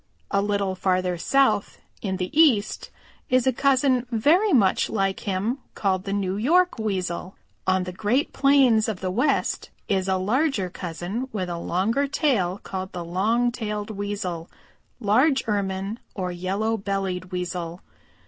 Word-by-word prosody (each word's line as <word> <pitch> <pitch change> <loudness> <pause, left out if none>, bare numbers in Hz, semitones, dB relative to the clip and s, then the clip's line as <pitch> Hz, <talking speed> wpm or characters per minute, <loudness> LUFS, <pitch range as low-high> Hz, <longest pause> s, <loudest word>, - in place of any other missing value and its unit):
A 200 - +2
little 200 -2 0
farther 185 -1 0
south 265 +4 +2 0.2
in 190 -3 -2
the 180 +5 -4
East 260 -10 +3 0.4
is 255 -1 +3
a 260 - +3
cousin 260 -1 +2
very 315 - +3
much 205 -9 +3
like 195 -2 0
him 205 +7 -1 0.2
called 190 -2 0
the 195 - -3
New 195 -1 -1
York 345 - +3
Weasel. 185 -3 -3 0.3
On 185 0 +3
the 180 - -5
Great 220 +9 0
Plains 265 -6 +4
of 205 -5 -3
the 185 -1 -2
West 255 +9 0 0.2
is 190 -1 0
a 190 0 +2
larger 210 - 0
cousin 180 +9 -4
with 185 -4 -3
a 170 -1 -3
longer 225 +12 0
tail 225 - +1
called 190 0 -5
the 175 -2 -5
Long 220 +8 +1
tailed 210 -3 -4
Weasel, 200 -5 -4 0.5
Large 250 +6 +3
Ermine, 200 +1 -2 0.2
or 185 -2 -2
Yellow 195 +6 -1
bellied 195 -3 -2
Weasel. 180 -1 -4
200 Hz, 150 wpm, -24 LUFS, 185-245 Hz, 0.5 s, Plains